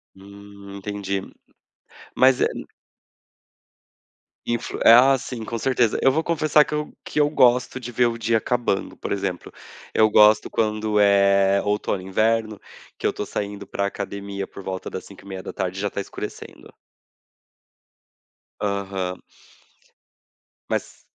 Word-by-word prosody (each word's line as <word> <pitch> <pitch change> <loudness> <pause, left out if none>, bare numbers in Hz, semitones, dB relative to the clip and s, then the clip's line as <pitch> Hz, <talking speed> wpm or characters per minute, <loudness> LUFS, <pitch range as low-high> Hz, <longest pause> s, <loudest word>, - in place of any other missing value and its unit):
Hum, 100 0 -13
entendi. 100 -1 -3 0.9
Mas 130 0 +4
é - - +4
na - - -7 1.8
Influ 120 0 -3
ah, 130 +4 +8
sim, 125 -3 -7
com 115 +1 -4
certeza. 120 -2 +1
Eu 135 - +5
vou 160 +4 0
confessar 155 -2 +3
que 150 - -7
eu 150 0 -3
que - - -3
eu 145 0 +4
gosto 125 -2 +3
de 120 -1 -7
ver 120 +1 +2
o 115 -1 -1
dia 115 0 +1
acabando, 120 -5 -1
por - - -6
exemplo. 95 -3 -3 0.4
Eu 110 0 +4
gosto 105 0 +5
quando 110 -1 0
é 100 -1 +4
outono, 105 -2 -1
inverno, 110 +3 0 0.4
que - - -7
eu - - +3
tô 105 - -5
saindo 100 0 -5
para 100 - -3
a - - +1
academia 100 0 -5
por 100 - -11
volta 95 0 -5
das 95 - -7
17h30 95 -1 -6
e - - -3
já 100 - -1
tá 100 - -5
escurecendo. 100 - -8 1.9
Aham. 95 -2 -3 1.5
Mas - - -4
105 Hz, 135 wpm, -23 LUFS, 100-120 Hz, 1.9 s, ah